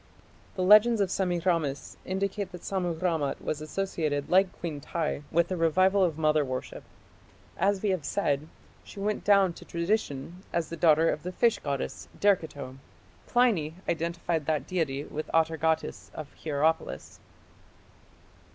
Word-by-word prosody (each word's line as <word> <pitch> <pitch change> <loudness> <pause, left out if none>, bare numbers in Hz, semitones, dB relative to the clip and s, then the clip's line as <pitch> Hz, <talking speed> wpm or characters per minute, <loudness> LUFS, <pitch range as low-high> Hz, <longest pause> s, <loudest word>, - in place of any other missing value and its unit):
The 185 - -1
legends 215 +4 +7
of 195 -2 +1
Semiramis 175 -6 -1
indicate 195 +1 -2
that 175 - -9
Sammu 180 -3 -1
rammat 165 -6 0
was 150 - -3
associated 155 -4 -2
like 190 +1 +5
Queen 155 -4 -4
Tiy 155 -1 -2
with 170 +1 +2
the 185 - -2
revival 185 +4 +3
of 165 -4 0
mother 155 -1 +3
worship. 130 -2 -5 0.7
As 200 0 +1
we 205 - +2
have 185 -5 -1
said, 145 -4 -1 0.4
she - - -11
went 210 +1 -1
down 195 -3 +4
to - - -12
tradition 170 -3 -2
as 170 -2 -1
the 170 - -5
daughter 160 -1 +4
of 150 - -4
the 180 - -5
fish 230 +5 +2
goddess, 140 -2 -4
Derceto. 150 -10 0 0.5
Pliny 205 -11 +2
identified 170 -2 -1
that 150 -4 0
deity 150 -6 -1
with 155 +1 -6
Atargatis 160 0 0
of 155 -2 -8
Hierapolis. 155 +1 -1
170 Hz, 140 wpm, -28 LUFS, 155-190 Hz, 0.7 s, legends